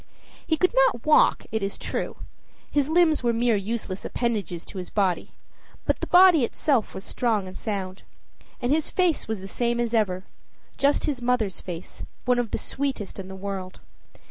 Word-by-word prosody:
He 315 - +2
could 365 +6 +2
not - - +3
walk, 305 - +5
it 220 - -1
is 195 +1 -3
true; - - -3 0.6
his 290 0 +1
limbs 320 -2 +4
were 240 -1 +2
mere 235 0 +2
useless 200 -1 -3
appendages 210 -8 -2
to 195 - -8
his 180 - -6
body; 195 -4 0 0.5
but - - +1
the - - -3
body 355 -5 +7
itself 255 -1 0
was 190 - -6
strong 220 -6 0
and 185 - -9
sound. 195 -3 -4 0.6
And 245 - -1
his 310 +1 +2
face 360 -4 +1
was 220 -3 -3
the 195 - -7
same 235 +3 -1
as 240 -1 -1
ever 190 -5 +1 0.6
just 280 +1 +3
his 280 -5 -2
mother's 240 -6 0
face, 175 -1 -8 0.2
one 250 0 +3
of 240 -2 -1
the - - -2
sweetest 265 -9 -4
in 190 - -6
the 190 - -8
world. 190 -1 -5
230 Hz, 180 wpm, -25 LUFS, 195-280 Hz, 0.6 s, body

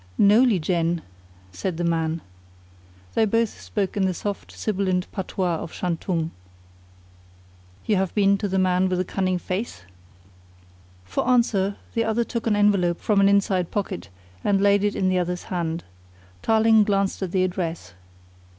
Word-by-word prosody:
"No, 205 +4 +6
Lieh 245 -6 +4
Jen," 170 0 0 0.5
said 165 - -3
the 175 - -2
man. 165 -1 0 0.9
They 225 - +3
both 230 +1 0
spoke 195 -3 -2
in 195 -2 +2
the 185 - -1
soft, 205 +2 -5
sibilant 185 -3 -1
patois 185 -3 -2
of 160 - -7
Shantung. 165 -2 -2 1.5
"You 210 - +2
have 190 -1 -1
been 200 -1 +4
to 205 - -1
the 190 0 -1
Man 185 0 +2
with 185 - 0
the 185 - 0
Cunning 185 -1 0
Face?" 185 - -4 1.2
For 90 - -2
answer 210 -6 +2 0.2
the 230 - +1
other 225 +1 +1
took 235 0 -4
an 215 - +3
envelope 200 -4 +2
from 210 -2 +2
an 195 - +5
inside 195 -3 +2
pocket 195 -3 -4 0.3
and 200 -1 +2
laid 200 0 +4
it 205 0 +1
in 190 - +1
the 185 0 +2
other's 180 0 -2
hand. 170 -1 -2 0.6
Tarling 220 -1 +4
glanced 200 -2 0
at 185 -3 -2
the 185 -1 +2
address. 170 - -3
190 Hz, 160 wpm, -24 LUFS, 180-205 Hz, 1.5 s, No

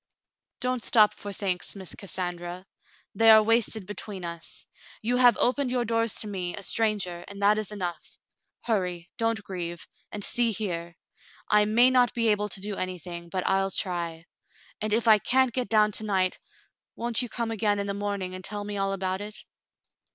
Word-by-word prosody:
"Don't 250 -2 -1
stop 210 -3 +5
for 205 - -7
thanks. 190 -2 -2
Miss 190 -3 -8
Cassandra; 180 -3 -5 0.5
they 225 +3 +5
are 220 -1 +9
wasted 225 -2 +1
between 200 -2 -6
us. 170 -1 -6 0.4
You 245 +3 +1
have 245 -3 +6
opened 260 +2 +2
your 245 -1 0
doors 230 -1 +1
to 215 - -3
me, 185 -3 -3
a - - -6
stranger, 200 -6 0
and 200 0 -9
that 210 +1 +5
is 215 -1 -3
enough. 180 -5 -5 0.4
Hurry, 180 -6 -2
don't 225 -1 0
grieve 175 -4 -5
— - - -36
and 205 - -5
see 235 +1 +2
here: 175 -5 -3 0.6
I 210 0 +6
may 235 +4 +5
not 250 -1 +3
be 230 -1 +2
able 210 0 +1
to 190 - -2
do 205 0 -3
anything, 175 -1 -5
but 185 +1 -2
I'll 195 0 +2
try; 170 -4 -2 0.6
and 215 0 -1
if 230 +2 +2
I 215 -1 +7
can't 260 +2 +2
get 250 0 -2
down 215 -1 +4
to 220 - 0
night, 190 -3 0 0.6
won't 235 0 -1
you 245 - -4
come 230 -1 -2
again 210 -2 +1
in 200 - -1
the 200 - -2
morning 200 -2 -3
and 185 0 -7
tell 205 +2 -2
me 205 0 -4
all 195 0 0
about 190 0 -2
it 210 +1 -7
205 Hz, 190 wpm, -27 LUFS, 185-225 Hz, 0.6 s, are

